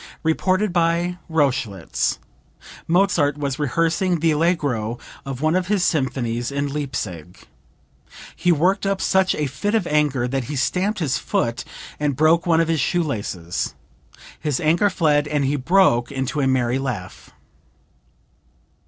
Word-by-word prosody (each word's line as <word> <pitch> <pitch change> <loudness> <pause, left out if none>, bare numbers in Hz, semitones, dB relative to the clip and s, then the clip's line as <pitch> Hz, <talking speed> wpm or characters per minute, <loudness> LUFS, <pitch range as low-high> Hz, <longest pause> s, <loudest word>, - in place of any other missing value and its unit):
(Reported 185 +4 +1
by 175 +1 +1
Rochlitz. 130 - 0 0.7
Mozart 170 -5 +2
was 140 -2 -3
rehearsing 165 +5 +1
the 165 +1 +2
Allegro 145 -9 0 0.3
of 135 -1 -5
one 155 +2 +2
of 185 -1 0
his 200 -2 +1
symphonies 125 -6 -1
in 140 +1 -1
Leipsic. 100 - -5 0.9
He 175 - +2
worked 185 +5 +2
up 195 -1 0
such 190 -1 +2
a 150 - -1
fit 205 - -2
of 220 - +1
anger 145 -5 +1
that 135 0 -2
he 145 - -5
stamped 190 +10 0
his 150 -7 0
foot 115 0 -1 0.4
and 145 -2 0
broke 160 +5 +3
one 165 -1 +4
of 165 - +2
his 165 -1 +1
shoe 175 +3 +1
laces. 100 - -3 0.6
His 150 -4 -1
anger 170 +6 +3
fled 150 -5 +2
and 150 -2 0
he 140 +2 +1
broke 140 -5 +3
into 135 +2 -2
a 135 - +2
merry 130 -1 +1
laugh.) 105 -9 -5
150 Hz, 145 wpm, -22 LUFS, 130-175 Hz, 0.9 s, one